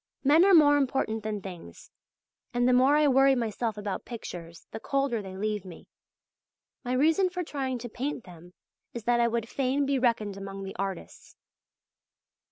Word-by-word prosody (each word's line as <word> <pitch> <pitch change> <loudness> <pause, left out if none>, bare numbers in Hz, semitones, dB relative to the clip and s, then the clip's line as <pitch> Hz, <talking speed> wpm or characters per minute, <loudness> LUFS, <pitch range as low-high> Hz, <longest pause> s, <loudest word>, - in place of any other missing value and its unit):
Men 300 +5 +5
are 395 -2 +6
more 290 -2 +6
important 255 -5 -1
than 210 -2 -4
things, 175 - -10 0.6
and 245 0 +2
the 250 - +4
more 260 +4 +5
I 300 0 +4
worry 270 0 +5
myself 225 -2 -2
about 205 -2 -4
pictures, 170 -8 -9
the 220 - -6
colder 275 -3 -1
they 190 -1 -9
leave 210 -1 -2
me. 180 -4 -12 1.0
My 250 0 -2
reason 320 +8 +3
for 360 0 -4
trying 270 -5 -3
to 240 0 -7
paint 250 +2 -4
them 175 0 -15 0.4
is 235 - -5
that 240 +1 +2
I 235 - +4
would 230 -1 -2
fain 270 +3 0
be 275 -1 0
reckoned 220 -5 0
among 195 0 -7
the 195 - -7
artists. 195 -2 -6
240 Hz, 175 wpm, -28 LUFS, 200-275 Hz, 1.0 s, are